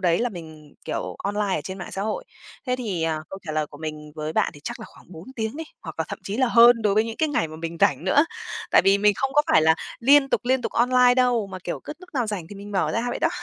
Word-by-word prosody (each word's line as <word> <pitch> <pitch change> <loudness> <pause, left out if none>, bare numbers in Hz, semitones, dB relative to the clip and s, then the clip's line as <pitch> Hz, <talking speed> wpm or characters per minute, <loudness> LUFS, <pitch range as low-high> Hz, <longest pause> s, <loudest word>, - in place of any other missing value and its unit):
đấy 170 -3 +2
là 245 +1 +1
mình, 160 -6 -11
kiểu, - - -4
online 205 -1 0
ở - - -1
trên 190 0 -6
mạng 175 - -8
xã 195 - -3
hội. 215 +1 -3 0.4
Thế 250 0 0
thì, 205 -9 -3
à, 160 -1 0
câu 195 - -7
trả 155 - -3
lời 155 0 0
của 145 0 -14
mình 155 -1 -7
với 155 0 -4
bạn - - +1
thì 145 - -13
chắc - - -5
là - - -8
khoảng 180 - -18
4 160 +1 -10
tiếng 220 +4 -3
đi, 325 - -5 0.2
hoặc - - -8
là - - 0
thậm - - -6
chí 200 - -4
là 255 -1 +2
hơn 235 0 +6
đối 205 -2 +2
với 215 +1 +3
những 225 0 -6
cái 315 - +1
ngày 165 - 0
mà 155 - -9
mình 165 +1 -5
rảnh 140 +4 +3
nữa. 285 +11 +4 0.5
Tại - - +6
vì 195 +1 +5
mình 210 0 +4
không 270 +4 -1
có 295 - +4
phải 155 - +6
là 160 0 +5 0.3
liên 275 +3 +5
tục, 225 - +1
liên 255 0 +1
tục - - -3
online 250 +1 +4
đâu, 245 -4 +2
mà, 190 -1 -8
kiểu, 175 - -4
cứ - - -5
lúc 365 - -15
nào 245 -4 0
rảnh 200 -6 -4
thì - - -10
mình 205 +1 -9
mở 190 - 0
ra 230 - 0
vậy - - -3
đó. - - +2
205 Hz, 300 wpm, -24 LUFS, 165-245 Hz, 0.5 s, hơn